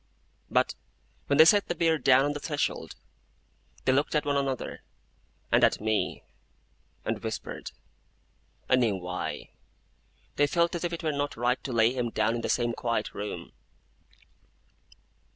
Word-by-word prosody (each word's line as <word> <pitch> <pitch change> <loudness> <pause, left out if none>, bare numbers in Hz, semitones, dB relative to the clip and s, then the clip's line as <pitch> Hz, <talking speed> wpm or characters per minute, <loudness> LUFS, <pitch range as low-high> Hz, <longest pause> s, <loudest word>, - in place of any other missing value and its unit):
But - - +2 0.5
when 140 - +2
they 160 - +9
set 200 +4 +5
the 175 - -2
bier 165 -1 +2
down 130 +1 +5
on 145 - 0
the 145 - -5
threshold, 145 -1 -2 0.9
they 130 - +4
looked 145 +4 +1
at 150 - +1
one 145 -1 +1
another, 135 -2 -2 0.7
and - - +4
at - - +4
me, 110 0 -1 0.8
and - - -2
whispered. - - -5 1.0
I 130 - +4
knew 115 -5 +2
why. 90 0 -5 0.9
They 145 - +4
felt 170 +4 +1
as 175 - -3
if 175 - -1
it 170 - -5
were 155 - +1
not 145 -2 -3
right 120 +2 0
to 135 - -4
lay 115 0 +3
him 125 -2 -1
down 110 0 +1
in 120 - -2
the - - -3
same 120 -1 +1
quiet 115 -2 -2
room. 105 0 -6
135 Hz, 155 wpm, -28 LUFS, 115-150 Hz, 1.0 s, they